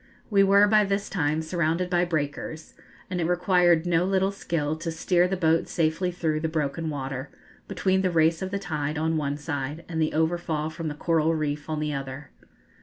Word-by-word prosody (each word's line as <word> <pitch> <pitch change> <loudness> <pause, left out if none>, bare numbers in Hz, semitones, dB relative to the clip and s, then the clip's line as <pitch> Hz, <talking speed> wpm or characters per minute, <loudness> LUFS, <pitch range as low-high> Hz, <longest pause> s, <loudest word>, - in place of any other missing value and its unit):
We 200 -1 +5
were 200 +1 +6
by 215 0 +5
this 200 0 -2
time 155 -3 0
surrounded 170 +1 0
by 180 -1 +2
breakers, 155 -1 -4 0.3
and 180 -1 -2
it 165 - 0
required 180 -1 +3
no 175 -1 +2
little 190 +1 +1
skill 160 -6 -2
to 165 +1 -4
steer 175 +2 +2
the 190 +1 -2
boat 165 -2 +2
safely 165 +2 0
through 160 -3 -1
the 160 +1 -2
broken 155 +1 -2
water, 135 -1 -4 0.4
between 190 0 +1
the 185 - +1
race 165 -1 +2
of 190 - -2
the 200 - -2
tide 155 -5 -3
on 160 +1 0
one 145 -2 -1
side, 150 +1 -4
and 160 -2 -2
the 155 - +1
overfall 160 -1 0
from 165 0 -5
the 150 - -3
coral 165 0 +1
reef 150 -1 -3
on 155 -1 -2
the 150 -1 -2
other. 135 0 -6
160 Hz, 195 wpm, -26 LUFS, 155-180 Hz, 0.4 s, were